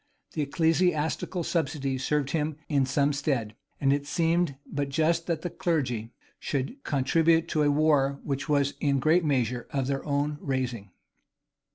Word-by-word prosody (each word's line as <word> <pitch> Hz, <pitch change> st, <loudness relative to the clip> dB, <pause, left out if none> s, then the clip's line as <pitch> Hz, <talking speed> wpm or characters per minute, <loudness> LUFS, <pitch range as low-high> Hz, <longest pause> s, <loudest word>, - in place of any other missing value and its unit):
The 155 Hz, -, -1 dB
ecclesiastical 160 Hz, +2 st, +1 dB
subsidies 140 Hz, -5 st, -1 dB
served 145 Hz, -2 st, 0 dB
him 155 Hz, -1 st, -1 dB
in 140 Hz, -4 st, +2 dB
some 140 Hz, +1 st, +2 dB
stead; 135 Hz, -7 st, -1 dB, 0.2 s
and 135 Hz, -1 st, +3 dB
it 145 Hz, 0 st, -2 dB
seemed 165 Hz, -2 st, +1 dB
but 140 Hz, -1 st, -3 dB
just 160 Hz, +4 st, +1 dB
that 165 Hz, -2 st, -1 dB
the 175 Hz, -, -3 dB
clergy 125 Hz, -9 st, -1 dB, 0.3 s
should 145 Hz, -, -3 dB
contribute 160 Hz, +4 st, +2 dB
to 155 Hz, -, +1 dB
a 145 Hz, -, +4 dB
war 145 Hz, -2 st, +2 dB
which 140 Hz, +2 st, -3 dB
was 140 Hz, -1 st, +2 dB
in 140 Hz, -2 st, +2 dB
a -, -, 0 dB
great 160 Hz, +6 st, +3 dB
measure 125 Hz, -5 st, 0 dB
of 135 Hz, -2 st, -1 dB
their 135 Hz, 0 st, -2 dB
own 145 Hz, +1 st, -1 dB
raising. 125 Hz, -7 st, -2 dB
145 Hz, 160 wpm, -27 LUFS, 135-160 Hz, 0.3 s, a